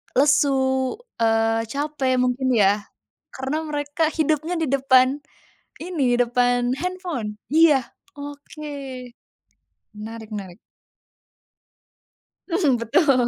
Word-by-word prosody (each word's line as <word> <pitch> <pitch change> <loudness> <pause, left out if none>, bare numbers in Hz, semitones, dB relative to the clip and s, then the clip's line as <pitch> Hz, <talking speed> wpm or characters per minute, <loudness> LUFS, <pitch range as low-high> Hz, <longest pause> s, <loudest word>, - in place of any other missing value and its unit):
lesu, 285 0 +4 0.6
eee, 225 0 +2
capek 280 -1 -1
mungkin 255 +1 0
ya, 205 -1 +3 0.4
karena 270 +4 -3
mereka 295 +2 0
hidupnya 315 +2 0
di 320 - 0
depan 265 +1 +3 0.6
ini, 285 -9 0
depan 245 +1 +2
handphone, 340 - -4 0.2
iya, 300 -6 +4 0.2
oke. 290 +1 -9 1.3
Menarik 220 +1 -8
menarik. 195 -4 -7 1.9
Mhm, 325 -8 +2
betul. 250 +2 +3
265 Hz, 85 wpm, -23 LUFS, 235-300 Hz, 1.9 s, lesu